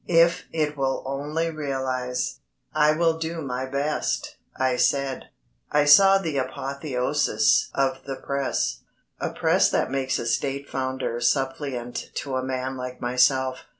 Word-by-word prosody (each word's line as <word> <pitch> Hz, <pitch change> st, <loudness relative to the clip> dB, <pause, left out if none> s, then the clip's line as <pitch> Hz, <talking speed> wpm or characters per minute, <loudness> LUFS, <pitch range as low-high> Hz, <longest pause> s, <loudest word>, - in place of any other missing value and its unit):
If 170 Hz, 0 st, +4 dB
it 150 Hz, -2 st, -1 dB
will 135 Hz, -1 st, -1 dB
only 150 Hz, +5 st, -2 dB
realise." 130 Hz, -4 st, -2 dB, 0.3 s
"I 150 Hz, 0 st, +4 dB
will 165 Hz, 0 st, +1 dB
do 165 Hz, +1 st, -3 dB
my 130 Hz, -1 st, -3 dB
best," 140 Hz, +3 st, -2 dB, 0.2 s
I 130 Hz, -1 st, +1 dB
said. 135 Hz, +1 st, +1 dB, 0.5 s
I 150 Hz, 0 st, +3 dB
saw 195 Hz, +7 st, +8 dB
the 160 Hz, -7 st, -2 dB
apotheosis 135 Hz, -3 st, +1 dB
of 135 Hz, -1 st, +1 dB
the 135 Hz, -1 st, -4 dB
Press 135 Hz, -, -2 dB, 0.4 s
a -, -, -1 dB
Press -, -, +3 dB
that -, -, 0 dB
makes 130 Hz, -1 st, 0 dB
a -, -, -4 dB
State 140 Hz, +4 st, -1 dB
Founder 130 Hz, -3 st, -2 dB
suppliant 130 Hz, -1 st, -1 dB
to 135 Hz, -2 st, -3 dB
a 130 Hz, -, 0 dB
man 130 Hz, 0 st, -3 dB
like 125 Hz, 0 st, -6 dB
myself. 130 Hz, +1 st, +2 dB
135 Hz, 140 wpm, -25 LUFS, 130-150 Hz, 0.5 s, saw